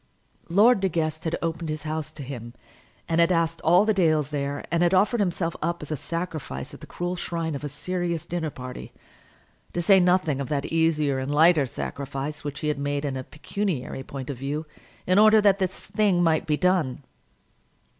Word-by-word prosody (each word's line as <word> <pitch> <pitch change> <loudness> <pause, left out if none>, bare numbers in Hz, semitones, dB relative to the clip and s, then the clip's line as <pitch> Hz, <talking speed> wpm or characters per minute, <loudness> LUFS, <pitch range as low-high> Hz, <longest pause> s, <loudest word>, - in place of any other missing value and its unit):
Lord 210 +6 +5
De 190 0 +1
Guest 155 -1 -2
had 160 - 0
opened 165 0 -2
his 155 -1 -3
house 155 -1 -3
to 150 - -8
him, 120 -3 -8 0.5
and 165 0 +2
had 170 +2 +4
asked 165 -1 +1
all 175 +5 +5
the 215 - +3
Dales 155 -6 +2
there, 140 -1 -3
and 170 0 +2
had 175 +2 +4
offered 215 +6 +3
himself 175 -3 0
up 170 0 -2
as 150 - -8
a - - +1
sacrifice 155 - -5
at - - -11
the - - -10
cruel 175 +1 -3
shrine 165 -2 -3
of 140 - -5
a 145 - -3
serious 170 +2 -3
dinner 170 -2 -2
party, 125 -3 -8 0.8
to - - -2
say 190 +3 +6
nothing 180 -6 +2
of 135 - -4
that 145 -2 -1
easier 155 -4 +1
and 130 +2 -3
lighter 155 -1 +5
sacrifice 140 +4 -5
which 145 -1 -5
he 150 - -1
had 150 -2 -1
made 145 +1 -2
in 135 -2 -2
a 130 - -4
pecuniary 150 -2 -4
point 135 0 -6
of 135 - -7
view, 145 +4 -3 0.4
in 185 +2 +4
order 215 0 +7
that 200 -1 +4
this 185 -1 -2
thing 200 -5 +1
might 165 -1 +2
be 150 -1 +2
done. 175 -8 +1
160 Hz, 200 wpm, -25 LUFS, 145-175 Hz, 0.8 s, order